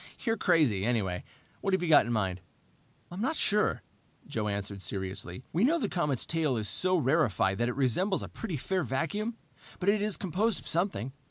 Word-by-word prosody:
"You're 225 -2 +2
crazy, 140 - +2
anyway. 100 -6 0 0.4
What 195 -1 +2
have 190 - -2
you 170 - -1
got 150 - +6
in - - -2
mind?" 95 -5 -1 0.7
"I'm 180 +3 -5
not 270 +7 0
sure," 210 -7 +2 0.4
Joe 110 -2 -2
answered 100 -1 -4
seriously. 95 +1 -4
"We 175 +7 +2
know 310 +7 +4
the 220 -10 -1
comet's 150 -8 0
tail 155 -6 0
is 110 -2 -1
so 185 - +3
rarefied 125 - +2
that 120 +1 +1
it 125 - -3
resembles 180 - +1
a - - -5
pretty 185 -9 -5
fair 185 +6 -1
vacuum, 205 - -2 0.4
but 190 - +1
it 205 0 +3
is 210 -1 0
composed 195 +3 0
of - - -14
something. 160 - -1
155 Hz, 190 wpm, -29 LUFS, -, 0.7 s, got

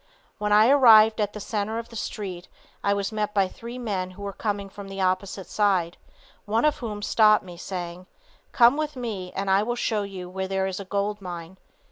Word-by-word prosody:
When 210 0 -1
I 210 +2 +6
arrived 225 -5 +7
at 205 -1 -1
the 210 - -6
center 210 +1 -2
of 230 0 -6
the 230 - -12
street 190 -5 -5 0.4
I 200 - +2
was 200 0 -1
met 210 -1 -2
by 195 -2 +3
three 235 +6 -9
men 200 -7 -3
who 185 +2 -11
were 200 0 -4
coming 205 -2 -3
from 200 0 -10
the 195 0 -7
opposite 185 +1 -1
side, 190 -5 +1 0.5
one 225 +5 +1
of 300 - +2
whom 210 -4 -5
stopped 215 0 +4
me, 175 -1 -10
saying: 180 0 -6 0.4
"Come 240 +3 +5
with 305 -1 -2
me 210 -8 -5
and 195 +1 -2
I 190 +1 +4
will 240 +3 -1
show 220 -3 0
you 190 -3 -6
where 190 +1 -4
there 190 0 0
is 190 0 -3
a 200 - -7
gold 205 +2 -2
mine." 175 0 -8
200 Hz, 210 wpm, -25 LUFS, 190-220 Hz, 0.5 s, arrived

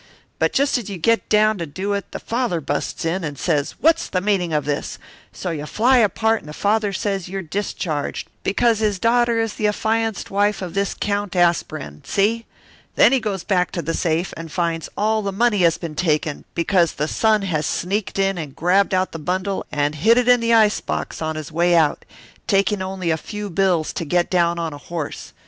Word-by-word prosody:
But - - +2
just 275 -1 +2
as 215 - -8
you 195 - -5
get 230 +7 +1
down 215 -1 +3
to 185 +5 -3
it 200 0 -3
the - - -4
father 230 -7 -1
busts 145 +3 -3
in 175 +3 -1
and 145 -3 -4
says 150 -3 -1
what's 330 +1 +3
the 185 - 0
meaning 185 -3 0
of 150 -2 0
this, 145 -1 -3 0.3
so 180 - -4
you 150 -2 -5
fly 250 +8 +3
apart 225 0 +2
and 150 - -13
the - - -7
father 210 +3 +1
says 195 -1 -2
you're 195 0 -4
discharged, 160 -4 -3
because 230 +2 +2
his 210 -3 +1
daughter 235 +2 +2
is 225 -2 -1
the 210 - 0
affianced 220 +1 -1
wife 205 0 +1
of 175 -2 -6
this 200 +1 -1
Count 205 -2 -2
Aspirin, 155 - 0
see? 225 +3 0 0.5
Then - - +6
he 270 - +3
goes 200 -5 -3
back 180 -4 +1
to 170 - -3
the 165 - -2
safe 165 +2 -1
and 165 -1 -8
finds 165 -2 -2
all 215 +1 +1
the 200 -1 -2
money 215 +1 +2
has 170 -3 +4
been 165 -3 -6
taken, 155 -2 -1
because 170 -1 +2
the 150 - -2
son 215 +3 +2
has 155 -5 -1
sneaked 195 +4 -2
in 195 -2 +1
and 145 -4 -7
grabbed 190 +3 +2
out 185 0 0
the 165 - -6
bundle 185 +4 -2
and 145 0 0
hid 220 +11 +4
it 250 -1 +2
in 245 0 +6
the 230 0 0
ice 215 -2 +4
box - - -4
on 160 0 -2
his 155 +1 -6
way 175 +2 +3
out, 155 -3 +2 0.4
taking 195 0 +2
only 185 -2 -2
a 160 - +1
few 210 +3 -6
bills 175 -3 +1
to - - -3
get 175 +3 +1
down 170 -2 +2
on 165 -2 -3
a 145 - -9
horse. 165 -3 -6
190 Hz, 210 wpm, -21 LUFS, 165-210 Hz, 0.5 s, Then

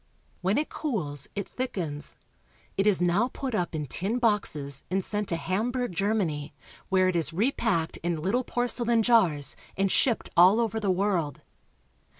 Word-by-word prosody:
When 190 +4 +1
it 305 - +1
cools, 155 - -3
it 200 -1 -3
thickens. 170 - -4 0.6
It 195 +2 +1
is 190 -4 +4
now 180 +7 +3
put 265 -3 -4
up 175 -5 -1
in 150 -1 -2
tin 195 - -2
boxes 175 - 0
and 190 +1 0
sent 210 -1 -2
to 170 - 0
Hamburg, 230 +8 -1
Germany, 170 -7 -1 0.3
where 185 -1 +4
it 185 - 0
is 165 -1 0
repacked 200 -5 0
in 170 0 -2
Httle 195 +11 0
porcelain 240 -2 +1
jars 185 - +3 0.2
and 195 0 +2
shipped 240 -4 +1
all 185 +5 +7
over 225 -1 0
the 205 -3 -1
world. 185 -6 0
195 Hz, 155 wpm, -27 LUFS, 170-225 Hz, 0.6 s, all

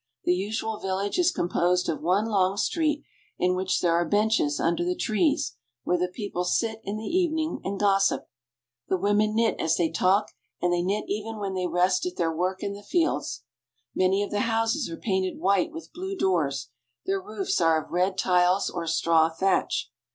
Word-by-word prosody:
The 180 - +3
usual 210 +3 -2
village 195 - -2
is 350 - +4
composed 180 +1 +1
of 160 - -2
one 185 +6 +2
long 195 -3 +1
street 300 +4 0 0.3
in 180 0 +2
which 185 0 0
there 170 -1 +2
are 170 +1 +3
benches 205 -5 +1
under 170 +1 +1
the 180 +1 -1
trees, 215 - 0 0.3
where 180 - +1
the 180 +1 0
people 180 -1 -4
sit 220 +4 0
in 200 +2 -4
the 215 - -6
evening 320 - 0
and 195 0 -3
gossip. 195 -1 +2 0.6
The 190 - +1
women 205 +3 +1
knit 230 0 +1
as 160 0 +1
they 165 -2 +1
talk, 195 +3 +2 0.3
and 175 0 +1
they 175 - +1
knit 200 +4 -1
even 215 +2 -4
when 200 -2 -3
they 185 -1 -1
rest 180 +2 +2
at 180 - -5
their 165 -2 -1
work 185 +3 -1
in 200 - -2
the 200 - -9
fields. 335 - -1 0.5
Many 190 +2 +2
of 205 - -5
the 205 - 0
houses 225 - 0
are 165 - -6
painted 190 -3 -1
white, 195 +3 +2
with 325 +1 -10
blue 380 +2 -5
doors; 140 - 0 0.4
their 195 0 0
roofs 200 -2 -2
are 160 -2 +3
of - - -20
red 185 +2 +1
tiles 180 +1 +2
or 170 -1 -4
straw 165 0 +3
thatch. 190 +4 0
190 Hz, 190 wpm, -26 LUFS, 180-215 Hz, 0.6 s, is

